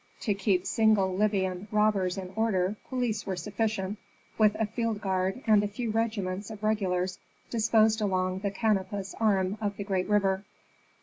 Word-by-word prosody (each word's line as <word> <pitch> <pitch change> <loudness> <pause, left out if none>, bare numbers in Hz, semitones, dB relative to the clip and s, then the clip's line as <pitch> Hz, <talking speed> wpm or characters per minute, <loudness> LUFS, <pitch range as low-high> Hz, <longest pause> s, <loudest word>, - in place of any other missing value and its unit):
To 210 - +1
keep 195 -2 +1
single 200 -2 +3
Libyan 190 -2 0
robbers 205 -3 +2
in 185 -1 -6
order 210 -3 +1
police 240 -5 -1
were 190 - -1
sufficient, 210 0 -2 0.4
with 215 -2 +4
a 220 - 0
field 225 0 -2
guard 190 +3 -1
and 215 -3 +5
a - - 0
few 220 +2 -3
regiments 210 -3 -2
of 215 -1 -9
regulars 185 -4 0 0.3
disposed 220 -1 +3
along 185 -2 0
the 200 +1 -1
Canopus 200 -2 -1
arm 200 -2 +1
of 205 -1 -2
the 200 - -3
great 190 -2 -1
river. 195 -2 +2
205 Hz, 160 wpm, -28 LUFS, 190-215 Hz, 0.4 s, and